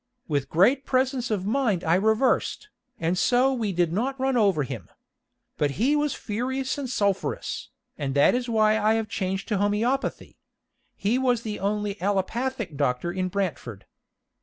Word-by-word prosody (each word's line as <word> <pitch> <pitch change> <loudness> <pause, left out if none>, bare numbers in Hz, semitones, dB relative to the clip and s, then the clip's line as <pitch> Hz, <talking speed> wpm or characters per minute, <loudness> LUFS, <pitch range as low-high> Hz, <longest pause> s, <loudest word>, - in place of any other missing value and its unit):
With 140 -3 -1
great 240 - +4
presence 255 -2 0
of 200 -4 -1
mind 215 -5 +1
I 165 - +2
reversed, 220 - +1 0.3
and 165 +2 0
so 250 +7 +3
we 225 -5 -1
did 175 -2 +1
not 260 +7 -1
run 265 0 +1
over 195 -10 +3
him. 125 -9 -7 0.7
But 145 -2 0
he 260 +8 +3
was 295 -1 0
furious 260 +5 -2
and 265 -3 -4
sulphurous, 200 -5 -1 0.3
and 140 -2 -2
that 140 - +5
is 245 0 -1
why 215 -1 +3
I 215 +1 +3
have 225 -1 -1
changed 195 -1 -3
to 210 - +1
homeopathy. 220 +7 -1 0.6
He 220 +6 0
was 245 -3 +1
the 210 -2 -4
only 205 0 -2
allopathic 205 - -1
doctor 140 +4 0
in 185 0 -2
Brantford. 175 - -4
210 Hz, 160 wpm, -25 LUFS, 185-250 Hz, 0.7 s, that